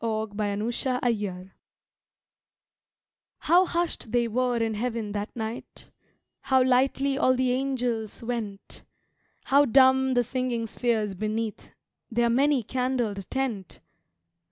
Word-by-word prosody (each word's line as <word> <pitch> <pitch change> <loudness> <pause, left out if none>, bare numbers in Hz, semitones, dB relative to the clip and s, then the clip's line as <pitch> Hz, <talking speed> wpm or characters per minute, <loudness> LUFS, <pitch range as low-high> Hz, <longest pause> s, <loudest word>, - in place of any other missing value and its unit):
Christmas 215 0 -2
in 255 -2 0
Heaven 190 -3 -5 1.9
HOW 355 +3 +5
hushed 340 -10 -3
they 240 -1 +2
were 245 +1 0
in 225 -1 0
Heaven 225 -1 -3
that 205 +1 -3
night, 225 +1 -7 0.5
How 260 -1 +3
lightly 270 +2 +2
all 255 -3 +4
the 255 0 +1
angels 245 -5 -2
went, 225 -4 -5 0.6
How 280 +2 +4
dumb 265 0 +4
the 245 - +3
singing 245 -1 -2
spheres 220 -2 -1
beneath 215 +2 -4 0.3
Their 235 0 +1
many 275 +1 +3
candled 245 -5 -2
tent! 240 -9 -3
240 Hz, 110 wpm, -26 LUFS, 215-260 Hz, 1.9 s, HOW